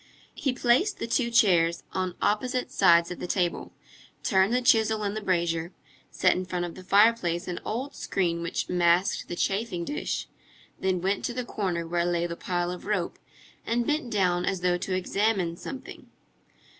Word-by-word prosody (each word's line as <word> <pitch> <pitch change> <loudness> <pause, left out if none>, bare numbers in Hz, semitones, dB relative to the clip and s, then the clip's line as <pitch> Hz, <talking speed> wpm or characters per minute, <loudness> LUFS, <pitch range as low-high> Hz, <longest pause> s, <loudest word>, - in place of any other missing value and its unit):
He 270 - -1
placed 255 - +2
the - - -3
two 235 +1 0
chairs 175 -8 +3
on 185 -1 -2
opposite 250 +4 0
sides 170 -3 +4
of 180 - -6
the - - -4
table, 175 -2 -1 0.5
turned 190 +2 +3
the 250 +1 +1
chisel 220 -3 +3
in 200 0 -1
the 215 - -4
brazier, 170 -2 -1 0.4
set - - +3
in 185 - -2
front 180 -1 -3
of 170 - -7
the 185 - -11
fireplace 195 -3 +3
an 175 -1 -3
old 255 +6 -4
screen 170 -3 -1
which 170 - -3
masked 175 +1 +2
the 175 - -4
chafing 195 -2 -1
dish, 295 - -3 0.5
then 185 -2 0
went 195 +2 0
to 240 - -3
the 250 -1 -3
corner 180 -7 -2
where 170 +1 0
lay 175 -1 0
the 170 -1 -4
pile 175 0 -2
of 180 +2 -8
rope, 200 -5 -1 0.4
and 235 +1 0
bent 300 -3 -1
down 180 -5 +1
as 190 0 -1
though 180 -1 +1
to 185 0 -2
examine 190 -2 0
something. 260 +9 -9
185 Hz, 180 wpm, -27 LUFS, 175-225 Hz, 0.5 s, sides